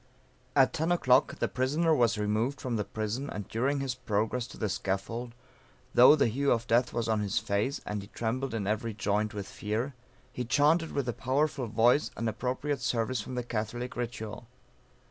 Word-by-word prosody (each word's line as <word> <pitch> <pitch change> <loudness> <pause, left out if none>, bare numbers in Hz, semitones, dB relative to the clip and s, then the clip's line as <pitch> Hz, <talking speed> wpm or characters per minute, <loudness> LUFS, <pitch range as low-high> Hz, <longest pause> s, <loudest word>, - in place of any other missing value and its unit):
At 135 -2 +5
10 165 +2 0
o'clock, 130 -6 +3
the - - 0
prisoner 150 +6 +1
was 120 -7 +3
removed 110 +6 0
from 125 -2 -2
the 105 - 0
prison, 110 +7 -3
and 105 -2 -5
during 135 +5 0
his 135 -2 -1
progress 115 0 -1
to - - -12
the 110 - -1
scaffold, 115 +5 -3 0.6
though 125 +5 +8
the 145 - +3
hue 135 +5 +1
of 115 0 +1
death 120 +2 +2
was 115 -1 -2
on 110 -1 +1
his 100 -1 -1
face, 105 +8 0
and 105 -1 -3
he 100 - -10
trembled 120 +3 -2
in 105 -3 -2
every 110 +2 -1
joint 105 0 0
with 100 -1 -4
fear, 110 +6 -3 0.4
he 125 - -3
chaunted 150 +6 +3
with 140 -3 -2
a 120 - 0
powerful 135 +1 0
voice 115 +6 +3
an 115 - -1
appropriate 130 +5 -2
service 125 -1 0
from 125 - -7
the 125 - -2
Catholic 120 +2 -4
ritual. 115 -2 -5
120 Hz, 185 wpm, -29 LUFS, 110-130 Hz, 0.6 s, though